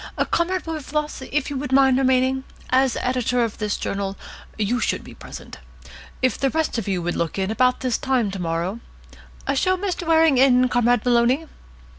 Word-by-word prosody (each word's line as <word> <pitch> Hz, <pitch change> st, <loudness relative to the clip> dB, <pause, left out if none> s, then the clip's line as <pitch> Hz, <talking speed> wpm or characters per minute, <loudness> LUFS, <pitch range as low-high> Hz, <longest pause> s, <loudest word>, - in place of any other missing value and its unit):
Comrade 365 Hz, +2 st, 0 dB
Wilberfloss, 300 Hz, -2 st, -3 dB
would 295 Hz, 0 st, 0 dB
you 280 Hz, -, -3 dB
mind 265 Hz, -1 st, +5 dB
remaining? 260 Hz, 0 st, +2 dB, 0.3 s
As 260 Hz, -1 st, +3 dB
editor 250 Hz, -1 st, 0 dB
of 225 Hz, -2 st, -4 dB
this 210 Hz, -1 st, -1 dB
journal, 195 Hz, -1 st, -3 dB, 0.4 s
you 220 Hz, +3 st, 0 dB
should -, -, -1 dB
be -, -, -12 dB
present. -, -, -11 dB, 0.6 s
If 255 Hz, -, +1 dB
the 270 Hz, -, +2 dB
rest 315 Hz, -5 st, -1 dB
of 215 Hz, -, -6 dB
you 185 Hz, -3 st, -1 dB
would 175 Hz, +1 st, -2 dB
look 170 Hz, +2 st, -2 dB
in 190 Hz, +1 st, -1 dB
about 250 Hz, +3 st, +2 dB
this 255 Hz, -3 st, 0 dB
time 250 Hz, -6 st, 0 dB
to 190 Hz, -, -6 dB
morrow 170 Hz, +5 st, -2 dB, 0.7 s
Show 370 Hz, +7 st, +1 dB
Mr. 360 Hz, -3 st, -3 dB
Waring 320 Hz, -4 st, +4 dB
in, 255 Hz, -1 st, +5 dB
Comrade 245 Hz, -1 st, +2 dB
Maloney." 245 Hz, +5 st, +3 dB
255 Hz, 170 wpm, -22 LUFS, 220-275 Hz, 0.7 s, mind